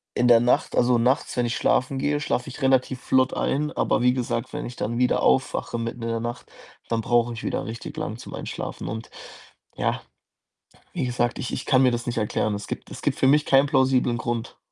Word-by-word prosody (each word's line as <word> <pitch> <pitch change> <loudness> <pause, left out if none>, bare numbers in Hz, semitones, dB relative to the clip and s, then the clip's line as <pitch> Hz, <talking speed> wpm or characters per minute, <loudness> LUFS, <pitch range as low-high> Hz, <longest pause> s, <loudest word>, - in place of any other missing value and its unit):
in 125 - +3
der 115 -1 +7
Nacht 120 +1 +1
also, 120 0 +4
nachts, 125 +3 +1
wenn 120 - +2
ich 120 - -1
schlafen 130 +1 +1
gehe, 145 +1 0
schlafe 125 -3 -1
ich 130 - -10
relativ 130 -1 +2
flott 130 0 +2
ein. 150 +2 -1
Aber - - +1
wie 125 0 +4
gesagt, 120 -2 -2
wenn - - -4
ich 120 - -7
dann 120 +2 -2
wieder 125 0 +2
aufwache, - - +1
mitten 115 +1 -4
in 115 - -2
der 115 - -1
Nacht, 120 +1 -6 0.4
dann 115 -1 0
brauche 120 +1 +2
ich 115 - -8
wieder - - -1
richtig 115 +1 -7
lang - - -4
zum - - -10
Einschlafen. - - -6
Und, 110 +2 -6 0.7
ja, - - -1 0.9
wie 155 -7 -1
gesagt, 120 -1 -1
ich 125 - -4
ich - - -4
kann 130 -1 +4
mir 130 - +4
das 120 0 -3
nicht 120 - -2
erklären. 105 -1 0
Es 100 - -7
gibt - - -6
es - - -8
gibt - - 0
für 130 - +4
mich 150 +2 +4
keinen 135 +1 +4
plausiblen 130 -4 +2
Grund. 115 0 -4
125 Hz, 220 wpm, -24 LUFS, 115-130 Hz, 0.9 s, der